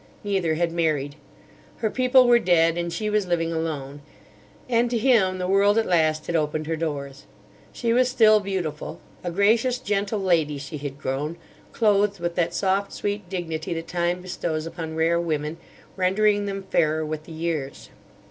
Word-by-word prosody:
Neither 190 -6 0
had 170 +1 0
married. 155 -4 0 0.6
Her 220 -2 -1
people 255 0 +4
were 240 0 +6
dead 165 -4 +3
and 170 0 -2
she 215 +4 -3
was 210 -2 0
living 165 -1 0
alone; 145 -3 -4 0.7
and 240 -1 +2
to 240 - 0
him 215 -6 +3
the 180 0 -2
world 200 +2 +4
at 225 - +2
last 155 -3 +1
had 170 - -2
opened 155 0 0
her 165 +1 -1
doors. 140 -4 -5 0.4
She 230 -2 -1
was 250 +1 +3
still 220 -4 +5
beautiful. 185 -7 -4 0.2
A 175 - -2
gracious, 220 +7 +2
gentle 205 -3 -1
lady, 165 -6 +1
she 140 +2 -7
had 140 -1 -6
grown; 145 +4 -3 0.3
clothed 205 -3 +2
with 170 0 -2
that 170 -1 -1
soft 195 +1 0
sweet 205 -2 -3
dignity 170 -2 -3
that 165 0 -5
Time 175 +1 -1
bestows 165 -3 -3
upon 165 -1 -6
rare 165 +1 +2
women, 155 -1 -2 0.4
rendering 205 +2 +2
them 195 -1 -4
fairer 155 -4 +1
with 155 0 -5
the - - -12
years. 160 -4 -4
175 Hz, 170 wpm, -24 LUFS, 155-205 Hz, 0.7 s, were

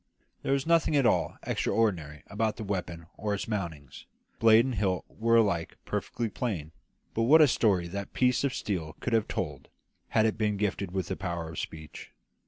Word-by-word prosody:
There - - 0
was 135 -1 0
nothing 165 -2 +3
at 140 -3 +4
all 85 -6 +2
extraordinary 80 -10 0
about 110 +1 -1
the - - -5
weapon 90 -4 -4
or 105 -1 -1
its 100 - -5
mountings; 85 - -5 0.3
blade 115 +1 +6
and 130 - -2
hilt 95 -4 0
were 115 +1 +1
alike 100 -7 +2
perfectly 115 -1 -2
plain; 100 - -3 0.4
but 115 - 0
what 160 +2 +8
a 155 - +8
story 100 -9 +2
that 100 +2 -5
piece 125 0 +2
of 140 - +1
steel 85 -10 -3
could 120 - -3
have 110 -2 +2
told, - - -4 0.4
had 110 - +3
it 110 0 0
been 105 -2 +1
gifted 100 -2 -1
with 95 -1 -3
the 95 - -1
power 85 -4 -4
of 85 - -5
speech. 80 -1 -8
100 Hz, 190 wpm, -29 LUFS, 85-115 Hz, 0.4 s, what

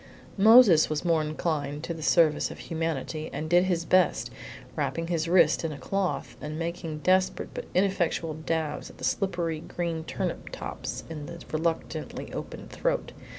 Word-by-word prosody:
Moses 215 -6 +8
was 155 +2 -2
more 165 -2 +3
inclined 150 -1 -2
to 170 - -3
the 160 - -8
service 155 -1 +3
of - - -8
humanity, 160 -1 -3
and 155 - -4
did 175 +2 +4
his 175 -3 0
best, 185 +1 +3 0.4
wrapping 165 - -1
his 165 -2 0
wrist 175 0 +4
in 165 - -1
a 145 - -6
cloth, 190 +7 -2
and 150 +1 -5
making 165 -2 -4
desperate 185 0 +2
but - - -5
ineffectual 180 -4 +1
dabs 155 -1 -2
at - - -15
the - - -12
slippery 170 -5 0
green 165 0 -3
turnip - - -4
tops - - -5
in 150 -3 -7
the 170 - -7
reluctantly 160 +1 -3
opened - - -7
throat. - - -1
165 Hz, 160 wpm, -27 LUFS, 155-175 Hz, 0.4 s, Moses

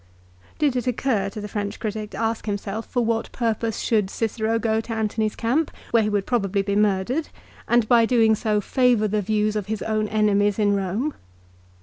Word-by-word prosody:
Did 290 -4 +1
it 250 0 -2
occur 235 -5 0
to 205 - -8
the 210 - -5
French 205 -1 -4
critic 215 -1 -4
to - - -9
ask 225 0 -2
himself 205 +2 -3
for 245 -3 0
what 225 0 -1
purpose 225 -2 -1
should 210 -4 +1
Cicero 225 +1 -1
go 225 -1 0
to 225 - -9
Antony's 220 -1 -1
camp, 265 +8 0 0.2
where 230 - +4
he 210 - 0
would 205 -2 0
probably 200 -5 0
be 200 0 -1
murdered, 210 +8 +1 0.4
and 235 -2 +3
by 235 0 +6
so - - +4
doing 225 -3 +4
favour 215 +2 +2
the 210 +1 0
views 215 +1 0
of 210 -3 -2
his 215 -1 -3
own 215 -1 0
enemies 205 -1 +2
in 205 -2 +2
Eome 200 +10 -1
215 Hz, 195 wpm, -23 LUFS, 205-230 Hz, 0.4 s, by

